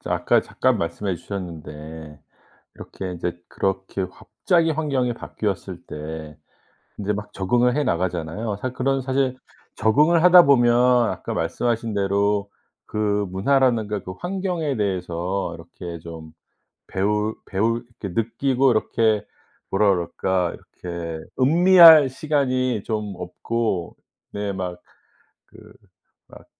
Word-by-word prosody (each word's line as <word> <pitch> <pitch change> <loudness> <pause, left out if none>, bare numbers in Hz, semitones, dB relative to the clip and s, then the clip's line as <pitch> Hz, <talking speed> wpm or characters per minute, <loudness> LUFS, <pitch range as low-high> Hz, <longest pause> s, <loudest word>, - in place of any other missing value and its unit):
저 - - -8
아까 - - +2
잠깐 - - 0
말씀해 95 +3 -2
주셨는데 80 -5 -8 0.6
이렇게 95 -1 -7
인제 85 0 -4
그렇게 95 0 -2
갑자기 165 - 0
환경이 140 -6 0
바뀌었을 95 -6 -5
때 75 0 -7 0.6
인제 105 0 -1
막 105 0 -6
적응을 120 +6 +1
해 150 - +1
나가잖아요. 90 - -2
사실, 130 +2 -4
그런 135 +1 0
사실 130 0 0 0.4
적응을 150 +10 +3
하다 180 0 +8
보면 120 -4 +5 0.4
아까 - - -5
말씀하신 115 +7 -1
대로 100 0 0 0.4
그 105 -1 0
문화라든가 110 0 +1
그 90 - -6
환경에 180 -6 -2
대해서 95 -2 -2
이렇게 85 +1 -9
좀 80 -1 -10 0.6
배우 105 +3 0
배울 115 +5 -1 0.2
이렇게 100 0 -2
느끼고 130 +3 +1
이렇게 110 -1 +1 0.4
뭐라 100 +1 +3
그럴까 90 0 -1
이렇게 85 -2 -7 0.2
음미할 165 0 +8
시간이 130 -6 0
좀 105 -2 -3
없고 90 +1 -3 0.4
네. 100 -1 -3
막 90 -2 -5 0.7
그 - - -19 0.7
막 - - -15
105 Hz, 260 characters per minute, -23 LUFS, 90-130 Hz, 0.7 s, 하다